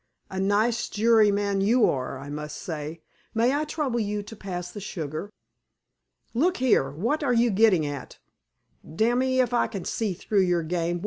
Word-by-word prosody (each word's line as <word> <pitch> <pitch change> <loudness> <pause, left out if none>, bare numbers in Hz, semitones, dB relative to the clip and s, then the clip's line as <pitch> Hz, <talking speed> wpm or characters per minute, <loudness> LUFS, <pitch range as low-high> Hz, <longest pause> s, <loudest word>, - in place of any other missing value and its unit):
"A 190 - -3
nice 210 +4 +1
juryman 205 -3 +3
you 230 +4 +4
are, 130 0 -2
I 140 +2 -9
must 150 0 -5
say! 160 0 -6 0.3
May 235 +4 +3
I 300 +2 0
trouble 290 -6 -2
you 210 -1 -2
to 215 +2 -10
pass 180 -3 -6
the 205 - -7
sugar?" 165 -2 -5 1.0
"Look 340 +10 +2
here! 240 - +3
What 220 - -1
are 250 -3 +2
you 235 0 +3
gettin' 195 -6 +4
at? 145 -2 -6 0.8
Damme 240 +6 +2
if 260 -2 +1
I 240 - +3
can 195 -5 -6
see 210 -5 -2
through 200 +2 +1
your 175 -2 +1
game. 170 +1 -1
205 Hz, 170 wpm, -26 LUFS, 170-235 Hz, 1.0 s, you